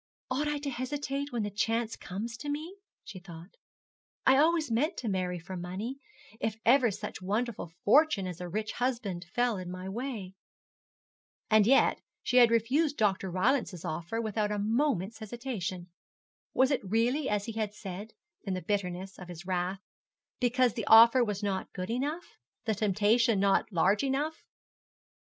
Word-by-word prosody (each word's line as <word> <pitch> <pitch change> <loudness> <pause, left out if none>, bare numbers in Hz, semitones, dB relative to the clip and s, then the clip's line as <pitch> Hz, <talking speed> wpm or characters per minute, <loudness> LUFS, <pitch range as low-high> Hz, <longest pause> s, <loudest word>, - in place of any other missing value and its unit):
'Ought 290 +4 0
I 295 0 0
to 285 -1 -4
hesitate 280 +2 -3
when 235 -3 -1
the 205 - -3
chance 225 +3 0
comes 215 +6 -5
to 290 - -6
me?' 310 +6 -4 0.3
she 195 - -9
thought. 175 0 -12 0.7
'I 265 0 +6
always 310 -2 +3
meant 300 +10 +1
to 240 - -4
marry 185 -3 -1
for 175 +3 -8
money, 190 +9 -5 0.4
if 220 -1 -1
ever 245 0 +5
such 195 - -6
wonderful 215 +2 -2 0.2
fortune 275 -4 +5
as 180 -1 -6
a 180 - -5
rich 215 +4 -2
husband 225 -9 -2
fell 240 -3 +1
in 180 -1 -6
my 185 +1 -6
way.' 215 -3 -5 1.2
And 215 -1 +6
yet 270 +2 +4 0.2
she 250 - +1
had 240 -2 +8
refused 270 +7 +2
Dr. 195 -3 +1
Rylance's 190 - 0
offer, 170 +8 -3
without 215 -2 -1
a 210 - -1
moment's 225 - 0
hesitation. 210 -6 -5 0.6
Was 260 +1 +3
it 275 - +1
really 235 +8 +1
as 205 -1 0
he 230 - -4
had 215 -2 -2
said, 205 +1 -8 0.3
in 195 -3 -2
the 185 - -4
bitterness 190 0 -3
of 180 - -9
his 175 0 -9
wrath, 185 +1 -2 0.6
because 250 -1 +2
the 225 - -4
offer 230 +3 +8
was 210 -2 -3
not 195 -2 -2
good 185 +3 -4
enough, 290 +8 -3 0.3
the 220 - +1
temptation 215 +2 +2
not 200 +2 +2
large 195 +5 +2
enough? 285 +4 -1
220 Hz, 165 wpm, -30 LUFS, 190-255 Hz, 1.2 s, had